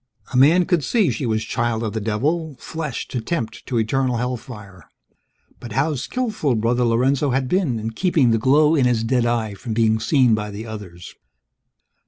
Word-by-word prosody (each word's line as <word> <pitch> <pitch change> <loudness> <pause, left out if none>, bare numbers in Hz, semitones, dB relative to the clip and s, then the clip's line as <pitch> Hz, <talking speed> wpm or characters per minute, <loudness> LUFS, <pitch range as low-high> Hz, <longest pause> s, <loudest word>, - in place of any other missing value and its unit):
A - - -3
man 160 +8 +5
could 170 -4 +1
see 215 - +2
she 135 - -3
was 110 -1 0
child 115 -1 -1
of 110 -2 -3
the 110 - -3
devil, 145 +9 -1
flesh 155 -6 -5
to 125 - -3
tempt 115 -4 -4
to 125 - -1
eternal 125 +2 0
hellfire. 115 - -6 0.7
But 120 - -8
how 150 +4 +1
skillful 185 - -2
Brother 120 +3 +1
Lorenzo 130 +5 +2
had 130 0 0
been 160 -6 0
in 110 +1 -4
keeping 150 -2 +2
the 115 - +2
glow 150 +6 +4
in 140 -5 +3
his 120 -2 +1
dead 120 0 +1
eye 115 -3 -1
from 110 +3 -6
being 110 -1 +2
seen 125 0 +3
by 105 -1 -1
the 105 +2 -7
others! 100 -6 -9
120 Hz, 185 wpm, -21 LUFS, 110-140 Hz, 0.7 s, man